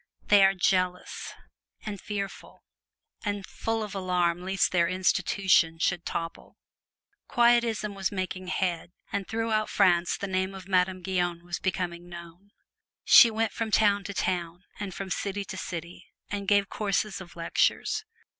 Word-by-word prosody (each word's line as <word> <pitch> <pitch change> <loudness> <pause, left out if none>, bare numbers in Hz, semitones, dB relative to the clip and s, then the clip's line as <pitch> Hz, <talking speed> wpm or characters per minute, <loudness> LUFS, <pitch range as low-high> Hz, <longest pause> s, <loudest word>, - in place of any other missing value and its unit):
They 205 -1 +7
are 195 0 +5
jealous, 185 0 0 0.5
and 205 -3 -5
fearful, 200 -2 -6 0.6
and 205 -2 -3
full 225 -1 -3
of 210 - -6
alarm 180 -2 0
lest 190 +1 +1
their 170 -2 +3
"institution" 185 -2 +2
shall 175 +2 +1
topple. 165 0 -6 0.7
Quietism 235 -3 +2
was 195 0 -2
making 185 -1 -4
head, 180 -2 -2 0.2
and 200 -1 -2
throughout 220 -1 0
France 175 -1 +3
the - - -4
name 190 0 -1
of 190 -1 -10
Madame 185 -1 +1
Guyon 175 -2 -1
was 175 -2 -4
becoming 175 -2 -3
known. 170 +3 -11 0.5
She 235 - +9
went 225 0 -1
from 225 -1 -3
town 205 -2 +3
to 200 - -5
town, 175 -1 -2 0.2
and 205 -2 -4
from 190 +1 -6
city 200 +3 -2
to - - -7
city, 175 -2 -7 0.2
and 200 -1 -3
gave 200 -1 +4
courses 205 -1 -1
of 175 -2 -12
lectures. 165 -1 0
190 Hz, 145 wpm, -27 LUFS, 175-205 Hz, 0.7 s, She